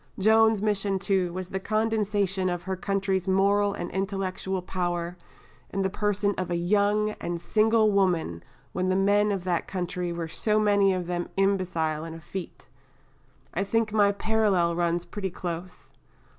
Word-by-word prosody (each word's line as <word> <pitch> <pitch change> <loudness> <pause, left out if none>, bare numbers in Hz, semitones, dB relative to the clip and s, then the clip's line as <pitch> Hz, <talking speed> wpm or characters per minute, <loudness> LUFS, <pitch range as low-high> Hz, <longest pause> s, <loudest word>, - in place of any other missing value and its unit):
Joan's 220 +1 +4
mission, 205 -2 +1
too, 190 -2 0
was 185 +1 -5
the 190 - -3
condensation 205 -3 0
of 175 -1 -3
her 190 0 -2
country's 195 -1 -1
moral 200 +2 +3
and 175 - -5
intellectual 190 -1 -2
power 175 -1 -2 0.5
in 195 - -1
the 190 - 0
person 205 0 0
of 185 - -2
a 175 - 0
young 205 +4 +2
and 170 0 -3
single 215 +3 +3
woman 175 - +1 0.3
when 185 0 -1
the 185 - +2
men 205 +2 +3
of 195 -3 -2
that 180 -2 -1
country 180 -1 -3
were 170 -1 -4
so 210 +6 +1
many 200 -2 +4
of 185 -2 -2
them 175 0 -3
imbecile 180 -6 0
and 165 0 -7
effete! 170 +2 -8 0.9
I 190 - 0
think 220 +1 0
my 205 -2 +4
parallel 200 -5 +1
runs 170 0 0
pretty 190 +2 -4
close." 175 0 -7
190 Hz, 160 wpm, -26 LUFS, 175-205 Hz, 0.9 s, Joan's